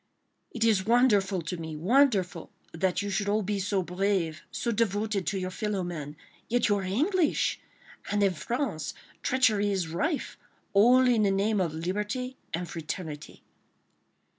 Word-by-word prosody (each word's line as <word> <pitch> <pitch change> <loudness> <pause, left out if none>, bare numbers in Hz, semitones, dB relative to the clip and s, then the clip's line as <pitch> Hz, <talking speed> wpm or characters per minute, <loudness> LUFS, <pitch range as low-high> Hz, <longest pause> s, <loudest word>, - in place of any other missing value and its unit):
"It 230 - -2
is 215 -4 +3
wonderful 205 -7 +3
to 175 +3 -4
me, 160 -1 -6
wonderful!—That 190 - +1
you 205 - -3
should 205 +1 -1
all 210 +1 +1
be 205 +1 -1
so 190 0 0
brave, 180 -3 -1
so 235 - -2
devoted 210 -3 0
to 195 - 0
your 185 0 -3
fellow 205 -1 -2
men—yet 165 +8 -3
you 205 - +2
are - - -2
English!—and 265 - -1
in 195 -2 +3
France 235 - -3 0.3
treachery 215 -6 +2
is 185 -4 -1
rife—all 250 - +1
in 240 -3 +3
the 205 - +3
name 200 +1 +1
of 165 -4 -1
liberty 210 +10 -3 0.2
and 175 +1 -3
fraternity." 160 -2 -6
200 Hz, 140 wpm, -28 LUFS, 180-225 Hz, 0.3 s, is